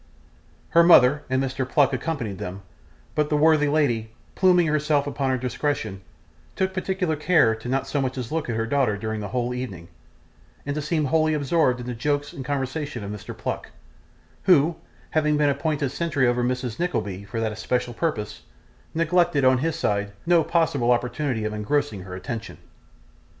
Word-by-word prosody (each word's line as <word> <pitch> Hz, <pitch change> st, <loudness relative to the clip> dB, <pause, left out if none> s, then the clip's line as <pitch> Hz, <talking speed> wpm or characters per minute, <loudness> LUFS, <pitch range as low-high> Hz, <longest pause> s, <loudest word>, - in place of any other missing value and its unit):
Her 170 Hz, -, +6 dB
mother 150 Hz, -4 st, +6 dB
and 130 Hz, +1 st, +1 dB
Mr. 130 Hz, -1 st, -3 dB
Pluck 140 Hz, -2 st, +3 dB
accompanied 125 Hz, -, -3 dB
them, 95 Hz, -1 st, -6 dB, 0.5 s
but 150 Hz, -1 st, 0 dB
the 150 Hz, -, +2 dB
worthy 155 Hz, -1 st, +4 dB
lady, 120 Hz, -7 st, 0 dB, 0.2 s
pluming 180 Hz, -2 st, +4 dB
herself 150 Hz, -2 st, +1 dB
upon 140 Hz, -1 st, -2 dB
her 130 Hz, -, +1 dB
discretion, 125 Hz, -5 st, -2 dB, 0.5 s
took 190 Hz, 0 st, 0 dB
particular 185 Hz, -3 st, -1 dB
care 150 Hz, -7 st, +3 dB
not 135 Hz, +2 st, 0 dB
so 135 Hz, +1 st, -1 dB
much 130 Hz, 0 st, -2 dB
as 125 Hz, -3 st, -4 dB
to -, -, -6 dB
look 160 Hz, -5 st, -2 dB
at 115 Hz, -, -1 dB
her 115 Hz, 0 st, 0 dB
daughter 120 Hz, -4 st, +1 dB
during 110 Hz, +1 st, -3 dB
the 105 Hz, -, -4 dB
whole 120 Hz, +3 st, -2 dB
evening, 100 Hz, -10 st, -6 dB, 0.8 s
and 140 Hz, -, -2 dB
to 150 Hz, -, -2 dB
seem 150 Hz, 0 st, 0 dB
wholly 155 Hz, +2 st, +2 dB
absorbed 145 Hz, -3 st, +1 dB
in -, -, -7 dB
the 125 Hz, -, -4 dB
jokes 145 Hz, +5 st, -1 dB
and 135 Hz, -, -6 dB
conversation 135 Hz, -2 st, -3 dB
of 100 Hz, -, -5 dB
Mr. 105 Hz, 0 st, -8 dB
Pluck, -, -, -4 dB, 0.8 s
who, 165 Hz, -2 st, +5 dB, 0.4 s
having 150 Hz, -1 st, +2 dB
been 150 Hz, -1 st, +3 dB
appointed 140 Hz, -1 st, -1 dB
sentry 145 Hz, -4 st, 0 dB
over 120 Hz, 0 st, +1 dB
Mrs 125 Hz, -2 st, -2 dB
Nickleby 100 Hz, -, -2 dB
for 110 Hz, +3 st, -5 dB
that 110 Hz, -1 st, 0 dB
especial 120 Hz, +3 st, -2 dB
purpose, 120 Hz, -7 st, -3 dB, 0.5 s
neglected, 165 Hz, -3 st, +2 dB
on 130 Hz, -1 st, +5 dB
his 160 Hz, +3 st, -1 dB
side, 100 Hz, 0 st, -1 dB
no 170 Hz, -1 st, +4 dB
possible 150 Hz, -8 st, +1 dB
opportunity 125 Hz, -1 st, 0 dB
of 110 Hz, -, -2 dB
engrossing 105 Hz, 0 st, -1 dB
her 90 Hz, 0 st, -8 dB
attention. 110 Hz, +4 st, -6 dB
135 Hz, 175 wpm, -24 LUFS, 115-155 Hz, 0.8 s, Her